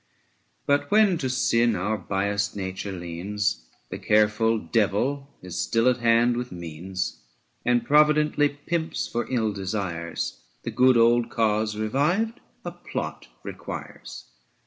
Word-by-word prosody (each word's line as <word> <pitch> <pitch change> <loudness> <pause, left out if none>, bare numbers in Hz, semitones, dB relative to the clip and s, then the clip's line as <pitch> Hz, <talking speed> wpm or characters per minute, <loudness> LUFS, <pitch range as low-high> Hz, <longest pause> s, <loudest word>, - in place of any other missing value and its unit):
But 145 0 +1
when 205 -4 +4
to 130 - -1
sin 120 -2 +2
our 100 +4 -1
biassed 100 +1 -1
nature 95 0 -4
leans, 90 -5 -3 0.2
The - - -5
careful 110 +2 +3
Devil 115 +8 0
is 90 -8 -5
still 65 - +1
at 125 -1 +4
hand 120 0 +3
with 125 0 -4
means 90 +2 -5 0.5
80 - - +4
And 120 -1 +2
providently 150 0 +4
pimps 160 +3 -3
for 120 - -3
ill 110 -4 0
desires; 85 - -4 0.2
The 115 - -4
good 125 +2 +4
old 115 0 +4
cause, 110 -1 0
revived, 155 - 0 0.3
a - - -3
plot - - -6 0.2
requires. - - -8
110 Hz, 130 wpm, -25 LUFS, 95-130 Hz, 0.5 s, when